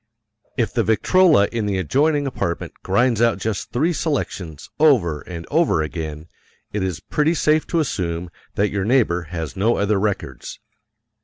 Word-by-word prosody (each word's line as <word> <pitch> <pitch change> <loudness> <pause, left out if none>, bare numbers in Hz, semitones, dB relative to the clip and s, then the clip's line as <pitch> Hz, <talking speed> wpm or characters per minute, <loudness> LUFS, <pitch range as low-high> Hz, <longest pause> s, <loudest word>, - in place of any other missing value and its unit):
If 115 -3 0
the 115 - +1
Victrola 110 - +4
in 115 -3 -2
the 100 -2 0
adjoining 145 - +1
apartment 85 -10 -3
grinds 115 +3 +2
out 115 -2 +3
just 105 +1 -3
three 155 +9 +1
selections 95 - -3
over 110 - +3
and 85 -2 -8
over 155 - +2
again, 80 0 -5 0.5
it 105 - -1
is 95 -2 -2
pretty 155 +3 0
safe 155 0 +2
to 170 - 0
assume 85 - -2 0.2
that 100 0 +1
your 100 -1 -1
neighbor 105 -7 +2
has 80 -4 -5
no 110 +5 +2
other 100 0 +1
records. 105 0 -3
105 Hz, 155 wpm, -21 LUFS, 90-140 Hz, 0.5 s, Victrola